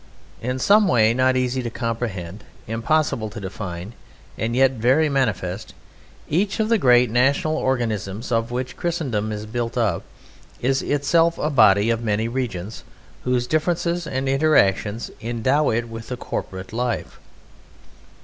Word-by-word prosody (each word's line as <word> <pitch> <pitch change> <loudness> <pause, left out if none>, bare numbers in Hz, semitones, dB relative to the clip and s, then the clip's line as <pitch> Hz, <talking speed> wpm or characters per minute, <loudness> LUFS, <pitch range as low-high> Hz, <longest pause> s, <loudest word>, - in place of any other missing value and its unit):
In 125 +2 -2
some 205 +9 +4
way 115 -5 +4
not 130 +1 +2
easy 130 0 0
to 120 - -3
comprehend, 110 -6 -4 0.2
impossible 115 0 0
to 110 - -8
define, 95 0 -6 0.4
and 115 +2 -2
yet 135 0 +5
very 130 +6 +2
manifest, 110 -8 -2 0.5
each 195 +8 0
of 215 0 +1
the 230 -2 +3
great 125 - +5
national 135 +6 +2
organisms 115 -6 -2
of 115 0 +1
which 125 +1 -4
Christendom 130 -12 -2
is 105 0 -5
built 115 +2 -3
up 110 -8 +1 0.6
is 135 +2 +1
itself 165 +4 +2
a 150 - -1
body 105 -4 +5
of 115 0 -1
many 110 0 0
regions 110 -5 -4 0.4
whose 125 -1 +1
differences 170 +3 0
and 135 -1 -2
interaction 125 - +2 0.2
endow 120 +6 +1
it 115 +1 0
with 115 0 -8
a 125 - -3
corporate 95 -4 -6
life. 120 0 -3
120 Hz, 140 wpm, -22 LUFS, 110-135 Hz, 0.6 s, yet